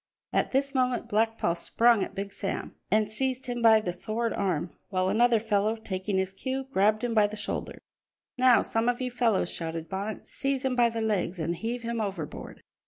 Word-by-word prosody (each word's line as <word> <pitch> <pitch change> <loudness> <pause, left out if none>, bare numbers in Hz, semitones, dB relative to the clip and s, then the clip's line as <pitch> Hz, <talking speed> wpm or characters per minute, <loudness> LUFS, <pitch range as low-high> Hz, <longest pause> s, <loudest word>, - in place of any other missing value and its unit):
At - - +2
this 275 +1 0
moment 255 -2 0
Black 225 +2 +1
Paul 170 - +1
sprung 225 +5 +3
at - - -7
Big 200 0 -4
Sam 195 - -4 0.2
and 215 +1 +3
seized 260 +4 -2
him 245 -2 -3
by 225 -1 +7
the 180 -5 -3
sword 225 +6 -2
arm, 175 -4 -1 0.2
while 185 0 +1
another 235 +2 +4
fellow, 215 0 +1
taking 195 -2 -3
his 190 0 -1
cue, 265 +6 -3
grabbed 210 +3 +3
him 240 -1 0
by 210 -2 +5
the 215 +1 -7
shoulder. 210 - -3 0.6
"Now 255 -1 +5
some 225 +2 0
of 245 - 0
you 255 -1 -2
fellows," 230 -7 +1
shouted 165 -1 -4
Bonnet, 200 +3 -4
"seize 270 -1 -2
him 260 -1 +1
by 240 -1 +4
the 230 0 -3
legs 200 -4 0
and 170 +1 -1
heave 235 +5 -4
him 230 -1 -2
overboard!" 190 -8 -6
220 Hz, 200 wpm, -28 LUFS, 195-240 Hz, 0.6 s, by